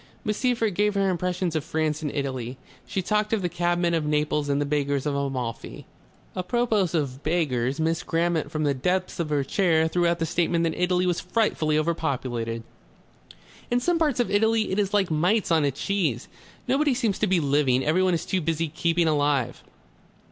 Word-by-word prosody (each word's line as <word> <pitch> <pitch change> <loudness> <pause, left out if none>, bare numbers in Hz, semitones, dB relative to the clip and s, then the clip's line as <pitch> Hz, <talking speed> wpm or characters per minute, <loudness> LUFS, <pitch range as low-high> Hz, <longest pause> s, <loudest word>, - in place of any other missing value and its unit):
Miss 210 -1 -1
Seyffert 235 -5 +1
gave 210 +2 +1
her 195 -1 +2
impressions 180 -1 -2
of 155 - 0
France 155 -1 -1
and 150 -2 -3
Italy. 130 -3 -4 0.3
She 190 - -2
talked 210 +2 0
of 210 -4 0
the 175 - 0
cabmen 175 0 0
of 165 -2 +1
Naples 150 -1 0
and 140 0 +1
the 145 - 0
beggars 140 -1 -1
of 145 - 0
Amalfi. 130 -4 -4 0.5
Apropos 210 0 +1
of 140 -4 -2
beggars, 140 -5 0
Miss 160 +1 0
Grammont 165 -2 0
from 155 0 -2
the 145 -1 +2
depths 180 +9 -1
of 165 -3 -1
her 145 -2 +1
chair 160 +1 +2
threw 175 +1 +1
out 170 0 +1
the 165 - -1
statement 170 +1 0
that 165 -1 0
Italy 180 +1 +1
was 175 -2 +1
frightfully 180 -6 0
overpopulated. 130 -8 -2 1.1
"In 245 - +2
some 340 +6 +1
parts 300 -6 +1
of 245 - +1
Italy 220 +1 +2
it 190 - 0
is 200 -2 0
like 200 -4 +1
mites 180 +7 +1
on 160 -3 +3
a - - +3
cheese. 145 - -1 0.4
Nobody 275 +1 +2
seems 230 -6 0
to 215 - +2
be 185 -2 +3
living. 140 -3 +2
Everyone 180 +3 +2
is 165 - -3
too 190 - -1
busy 165 0 -1
keeping 170 +2 +1
alive." 145 -5 +1
165 Hz, 190 wpm, -25 LUFS, 145-190 Hz, 1.1 s, on